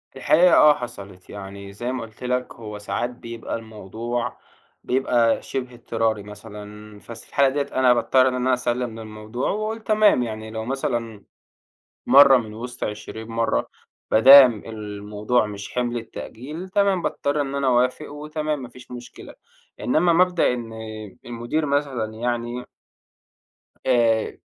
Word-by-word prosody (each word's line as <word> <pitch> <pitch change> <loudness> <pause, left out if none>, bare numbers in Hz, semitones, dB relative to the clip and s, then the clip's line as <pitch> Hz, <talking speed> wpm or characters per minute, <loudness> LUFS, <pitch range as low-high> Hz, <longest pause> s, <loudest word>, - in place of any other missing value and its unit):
الحقيقة 175 +3 +5
آه 150 -1 +7
حصلِت، 100 -8 -9
يعني 100 0 -9
زي 120 +5 -4
ما 130 - -3
قُلت 110 +2 -11
لك 125 0 -2
هو 105 -2 -8
ساعات 115 +3 -3
بيبقى 115 -2 -7
الموضوع 115 +2 -5 0.5
بيبقى 120 -3 +2
شِبه 125 -2 -5
اضطراري 115 -3 -1
مثلًا 105 0 -11
بس 115 +1 -11
في - - -23
الحالة 140 -1 +3
ديّة 145 +2 -1
أنا 130 -1 +5
باضطر 130 +2 +3
إن 130 - 0
أنا 130 +1 +1
أسلِّم 120 -2 -2
للموضوع 110 +2 -5
وأقول 215 +2 -2
تمام، 215 - +4
يعني 110 -1 -6
لو 110 0 -5
مثلًا 120 -5 -3 0.8
مرّة 140 -1 +8
من 110 -3 -3
وِسط 120 +2 -6
20 110 +1 -6
مرّة 115 0 0 0.4
ما - - +4
دام 130 -4 +9
الموضوع 105 +1 -2
مش 100 -1 -8
حِمْل 120 -1 -1
التأجيل 145 +9 -7
تمام 200 -2 +2
باضطر 145 +1 -1
إن 140 -1 -2
أنا 140 -1 0
أوافق 125 +4 +1
وتمام 150 -1 -3
ما 125 - -7
فيش 125 0 -15
مشكلة، 120 -1 -10 0.5
إنّما 170 +7 +2
مبدأ 180 -6 +3
إن 115 -2 -6 0.5
المدير 120 +6 -2
مثلًا 135 -6 -1
يعني 120 +1 -3 1.2
آآ 115 -3 +2
120 Hz, 140 wpm, -23 LUFS, 110-135 Hz, 1.2 s, دام